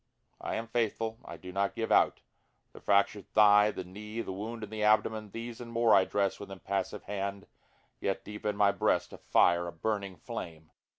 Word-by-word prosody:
I - - -3
am 115 - -3
faithful, 115 -1 -1
I - - -9
do 90 - -9
not 100 +1 -1
give 115 - -2
out, - - +4 0.5
The - - -11
fracturâd 100 0 +2
thigh, 105 -1 +6
the 95 - -5
knee, 105 +5 -7
the 95 - -5
wound 110 +3 -6
in 105 - -7
the 110 -1 -4
abdomen, 110 0 +2
These 115 +3 -7
and 120 -1 -8
more 115 -1 +4
I 95 - +6
dress 100 -2 0
with 100 - -8
impassive 95 +1 -3
hand, 100 0 -4 0.5
(yet 95 - -2
deep 105 0 -8
in 105 -1 -1
my 100 -1 +5
breast - - 0
a - - -10
fire, 85 0 +3
a - - -5
burning 100 +2 -3
flame.) 80 -1 -8
105 Hz, 195 wpm, -30 LUFS, 95-110 Hz, 0.5 s, thigh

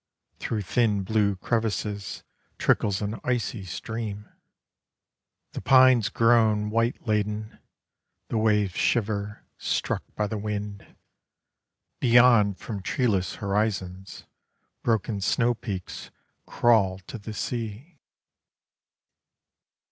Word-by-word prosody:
Through 110 -3 -2
thin 105 -1 +1
blue 100 0 +1
crevasses, 105 -1 -2 0.3
Trickles 100 0 +1
an 105 +2 -3
icy 120 -4 -1
stream. 105 +3 -5 1.2
The - - -6
pines 130 -4 +5
groan 110 -3 +3
white 115 +3 0
laden, 105 0 -2 0.7
The 115 - 0
waves 105 -3 +2
shiver, 105 -2 -1
struck - - -1
by 105 - 0
the 105 0 -3
wind; 105 -1 -5 1.0
Beyond 120 -5 +5
from 105 -4 -6
treeless 100 -5 0
horizons, 100 -2 -3 0.6
Broken 110 -2 0
snow 120 +5 +2
peaks 100 -6 -6 0.4
crawl 105 -6 +3
to 120 - -8
the 110 +1 -8
sea. 120 - -5
105 Hz, 95 wpm, -26 LUFS, 100-115 Hz, 1.2 s, pines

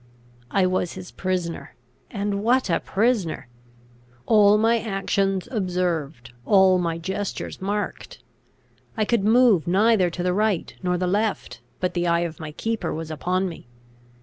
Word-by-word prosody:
I 190 +6 +2
was 185 -1 -1
his 185 -1 -9
prisoner; 180 -3 -3 0.3
and 200 -1 -2
what 245 -3 +2
a - - +2
prisoner! 200 - 0 0.8
All 210 -2 +5
my 225 +2 +3
actions 195 -2 -1
observed; 175 - -2
all 190 - +5
my 170 -2 -1
gestures 190 +4 -5
marked. 205 +2 -4 0.8
I 215 - +1
could 230 -2 +1
move 220 - +4
neither 195 0 +3
to 175 +1 -5
the 180 0 +1
right 210 -2 0
nor 180 -1 0
the 180 - -1
left, 195 - -1 0.2
but 180 - -1
the 175 -1 -1
eye 170 0 +2
of 170 -2 -4
my 155 -2 -6
keeper 220 +1 -3
was 160 0 -5
upon 180 +5 -1
me. 165 -8 -9
185 Hz, 150 wpm, -23 LUFS, 175-210 Hz, 0.8 s, All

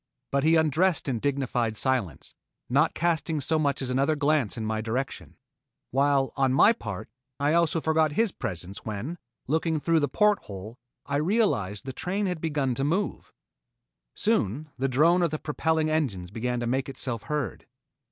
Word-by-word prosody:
But 140 0 +1
he 160 +2 +5
undressed 160 +2 +2
in 125 -4 -1
dignified 125 -5 -1
silence, 120 - -1 0.3
not 145 +6 +2
casting 165 -2 0
so 155 +3 +1
much 140 -2 0
as 130 - -2
another 135 +4 +2
glance 145 -6 +1
in 110 - -3
my 110 0 -1
direction, 120 +5 -4 0.5
while 135 0 +2
on 135 -2 +2
my 215 +11 +7
part 105 - -6 0.3
I 145 +2 +2
also 170 -1 +3
forgot 160 -1 +2
his 225 +4 +2
presence 95 - -5
when, 115 +11 -5 0.3
looking 160 +2 0
through 165 +2 +2
the 145 - +1
port 210 +8 +3
hole, 105 +4 -9 0.3
I 140 0 -1
realized 150 - +1
that - - -5
the - - -6
train 195 +5 -1
had 180 -4 -2
begun 145 -5 0
to 135 - -2
move. 175 +8 -1 0.8
Soon 155 - 0
the 135 +1 0
drone 160 +8 +4
of 170 - +2
the 155 - -2
propelling 155 +1 0
engines 105 - -1
began 125 +3 -2
to - - -1
make 130 +3 -1
itself 125 -4 -3
heard. 150 -4 -3
140 Hz, 170 wpm, -27 LUFS, 120-160 Hz, 0.8 s, my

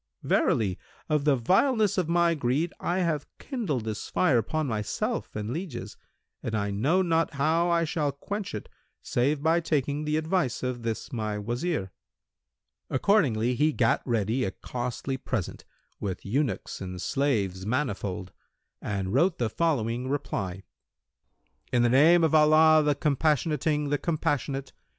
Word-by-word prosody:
Verily, 100 -5 +1 0.3
of 150 -2 +1
the 145 -2 +5
vileness 210 - +2
of 180 -4 0
my 170 0 +3
greed 145 +3 0
I 180 +2 0
have 155 -5 -1
kindled 200 - -3
this 110 -1 -4
fire 140 -10 +3
upon 155 +8 -1
myself 110 -5 -2
and 105 +1 -3
lieges, 160 -4 -5 0.5
and 110 - -3
I 100 -1 -1
know 145 - +2
not 165 -3 +1
how 160 +5 +2
I 170 -1 +3
shall 150 -2 -1
quench 195 - -5
it, 105 - -6 0.4
save 140 +4 0
by 165 +2 +4
taking 150 -2 -1
the 150 0 +1
advice 160 -5 0
of 125 -1 -2
this 115 +1 -4
my 110 -3 -2
Wazir." 120 - -2 1.0
Accordingly 130 - +2
he 150 +5 +2
gat 115 -5 +2
ready 115 +1 0
a - - 0
costly 125 +5 -4
present, 125 -7 -4 0.3
with 95 -3 -4
eunuchs 125 +2 -2
and 90 -1 -6
slaves 100 -8 0
manifold, 100 -7 -2 0.5
and 95 -1 -3
wrote 170 +7 +3
the 115 -3 -1
following 125 -6 0
reply, 100 -10 -3 1.1
"In 120 -1 +3
the 120 - +4
name 160 +7 +6
of 160 - +2
Allah 155 0 +6
the 150 -1 +2
Compassionating, 150 +1 +1
the 145 0 +1
Compassionate! 140 -4 -2
140 Hz, 145 wpm, -27 LUFS, 115-160 Hz, 1.1 s, name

